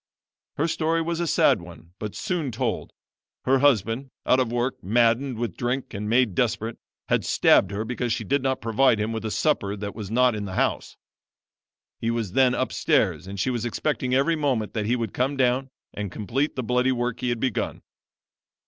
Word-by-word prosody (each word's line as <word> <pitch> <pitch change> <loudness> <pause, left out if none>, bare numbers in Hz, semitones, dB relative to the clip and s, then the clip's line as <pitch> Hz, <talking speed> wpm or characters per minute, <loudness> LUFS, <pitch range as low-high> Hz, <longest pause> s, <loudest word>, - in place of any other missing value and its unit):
Her 150 - +1
story 165 0 0
was 170 0 -2
a 170 - 0
sad 105 - +3
one, 85 -1 -13
but 105 -2 -5
soon 165 -8 -2
told. 105 - -2 0.5
Her 135 +1 +4
husband, 130 -1 +2 0.2
out 130 - +4
of 125 -3 0
work, 120 +2 -2
maddened 120 +5 +2
with 115 -6 -3
drink 125 +2 -2
and 105 +1 -4
made 120 -3 +3
desperate, 115 +1 -1 0.3
had - - +2
stabbed 95 - +4
her 105 +2 -3
because 125 0 -2
she - - -1
did 140 0 +1
not 130 0 -1
provide 115 0 +3
him 110 +2 -1
with 110 -1 -4
a - - -1
supper 105 -6 0
that 100 0 -5
was 105 -4 -7
not 125 +2 +3
in 105 -1 -4
the 95 -1 -6
house. - - -1 1.0
He 115 - -1
was 115 -5 -2
then 130 +2 +4
upstairs 90 - +1
and 100 0 -6
she 130 - +1
was 120 -2 -2
expecting 130 +2 -1
every 140 +5 +3
moment 130 -8 -1
that 105 -2 -2
he 120 - +2
would 115 -4 -3
come 135 +3 0
down 130 +1 +1 0.2
and 105 -3 -4
complete 120 - -2
the 130 - -2
bloody 125 +2 +2
work 120 -1 -2
he 125 - -1
had 120 -1 -1
begun. 130 -2 -2
120 Hz, 195 wpm, -25 LUFS, 110-130 Hz, 1.0 s, Her